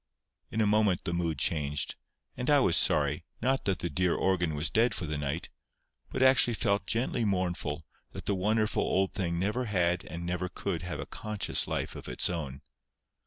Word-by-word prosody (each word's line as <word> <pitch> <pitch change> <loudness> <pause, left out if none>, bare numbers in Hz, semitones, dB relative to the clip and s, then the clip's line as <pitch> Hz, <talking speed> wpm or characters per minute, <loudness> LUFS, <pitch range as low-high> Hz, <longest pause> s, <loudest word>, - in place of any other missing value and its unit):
In 110 - -1
a - - +4
moment 105 -3 +3
the 85 - -2
mood 85 -3 -1
changed; 75 0 0 0.4
and 125 +3 -3
I 145 - +6
was 90 -10 +3
sorry, - - +3 0.2
not 135 +1 0
that 95 -2 +1
the 85 - -3
dear 90 +3 +1
organ 85 -5 +1
was 75 +3 -1
dead 115 +3 +3
for 90 - -3
the 75 -1 -2
night, 75 +2 -3 0.6
but 130 - 0
actually 130 -3 +6
felt 100 -1 0
gently 120 +2 0
mournful 90 -6 -1 0.3
that - - -7
the 100 - +1
wonderful 105 +3 +1
old 95 0 +1
thing 85 -3 -1
never 105 +8 0
had 90 -4 +1
and 85 +1 -6
never 90 +1 -2
could - - -3
have - - -5
a - - -4
conscious 105 -1 -1
life - - -2
of - - -8
its - - 0
own. 70 -5 -5
90 Hz, 190 wpm, -30 LUFS, 85-110 Hz, 0.6 s, I